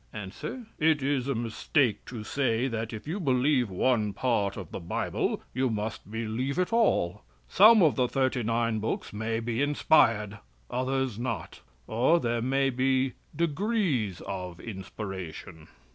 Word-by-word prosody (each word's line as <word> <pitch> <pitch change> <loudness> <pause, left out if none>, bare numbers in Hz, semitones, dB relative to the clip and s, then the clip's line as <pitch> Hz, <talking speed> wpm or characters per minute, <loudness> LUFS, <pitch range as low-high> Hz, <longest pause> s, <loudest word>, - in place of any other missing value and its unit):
A. 105 -3 -5 0.5
"It 155 -2 +3
is 135 -2 0
a 140 - 0
mistake 115 +1 0
to 115 -4 -7
say 125 0 0
that 115 -2 -3
if 110 +4 -8
you 175 +6 -2
believe 130 - +2
one 105 +2 +1
part 105 -6 0
of 95 -5 -7
the - - -5
Bible 85 - -2
you 130 0 +1
must 110 -2 -4
believe 115 +5 -2 0.2
all. 105 - +2 0.3
Some 215 +1 +7
of 155 - +3
the 125 -1 +3
thirty 130 -1 0
nine 115 0 0
books 110 0 -3
may 110 +2 -2
be 115 +2 -2
inspired, 115 -8 +3 0.3
others 130 -2 -1
not; 115 -8 -4 0.2
or 130 - +3
there 120 -4 -1
may 135 +2 +1
be 130 0 +1 0.2
degrees 165 - 0
of 90 -2 -6
inspiration." 95 -5 -7
120 Hz, 145 wpm, -28 LUFS, 105-135 Hz, 0.5 s, Some